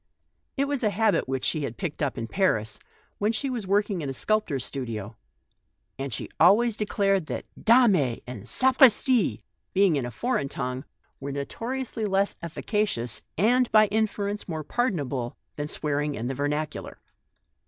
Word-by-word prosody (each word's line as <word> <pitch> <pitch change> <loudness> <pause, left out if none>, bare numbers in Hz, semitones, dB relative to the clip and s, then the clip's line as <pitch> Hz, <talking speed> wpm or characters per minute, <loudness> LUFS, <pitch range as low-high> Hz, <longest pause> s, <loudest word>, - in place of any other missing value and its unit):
It 275 - +2
was 280 -3 -2
a 215 - +4
habit 215 - +2
which 130 -1 -1
she 155 - +1
had 130 -5 -4
picked 170 -6 -4
up 145 -3 -1
in 115 - -3
Paris, 110 - 0 0.4
when 210 +2 +2
she 265 +4 -1
was 230 -6 -4
working 200 -2 +1
in 140 - -3
a 135 - -4
sculptor's 175 - 0
studio; 115 -5 -5 0.8
and 135 0 -3
she 110 - -3
always 210 +6 +5
declared 195 -4 +1
that - - -4 0.2
"dame" 210 - +4
and 125 -4 -8
"sapristi" 255 - +4 0.3
being 190 -5 +4
in 130 - -1
a - - -4
foreign 140 - -1
tongue, 130 0 -4 0.3
were 140 +1 -5
notoriously 230 - -4
less 195 0 +1
efficacious 170 - -2 0.2
and 245 +7 +3
by 215 0 +7
inference 210 -1 -1
more 160 -2 -3
pardonable, 145 - -2 0.2
than 145 0 -3
swearing 150 -1 -1
in 115 - -4
the 130 - -1
vernacular. 145 +2 -3
180 Hz, 155 wpm, -26 LUFS, 135-215 Hz, 0.8 s, by